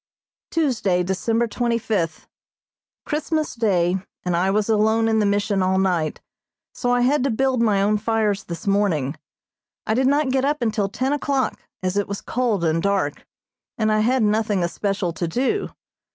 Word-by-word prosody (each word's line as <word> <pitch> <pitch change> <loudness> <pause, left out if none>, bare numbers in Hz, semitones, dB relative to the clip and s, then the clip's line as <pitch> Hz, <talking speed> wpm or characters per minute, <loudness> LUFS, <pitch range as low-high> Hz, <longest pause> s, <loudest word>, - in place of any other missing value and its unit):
Tuesday, 230 - +1
December 225 +6 0
twenty 235 +1 -1
fifth: 185 -8 -2 0.8
Christmas 310 0 -1
Day, 190 -6 +1 0.3
and 180 -1 0
I 180 +3 +2
was 205 +1 +1
alone 220 +1 +2
in 220 -1 +2
the 210 - +2
Mission 200 0 +1
all 185 0 +2
night, 180 -5 0 0.5
so 245 - -2
I 245 0 +3
had 260 +2 +2
to 275 - +1
build 260 +1 +1
my 205 -4 +3
own 210 +1 +2
fires 215 -2 0
this 170 -1 -7
morning. 185 -9 +1 0.7
I 220 - 0
did 260 +3 +2
not 285 -1 +2
get 265 0 +1
up 290 -1 0
until 215 -3 0
ten 260 +7 -1
o'clock, 275 -2 -1 0.2
as 185 +2 -1
it 205 - 0
was 200 0 -4
cold 235 -7 -1
and 165 0 +1
dark, 195 -7 -1 0.5
and 215 -2 +1
I 215 - +2
had 245 +3 +2
nothing 210 -3 +1
especial 185 +1 -2
to 170 +1 -3
do. 265 - -1
215 Hz, 170 wpm, -22 LUFS, 190-245 Hz, 0.8 s, I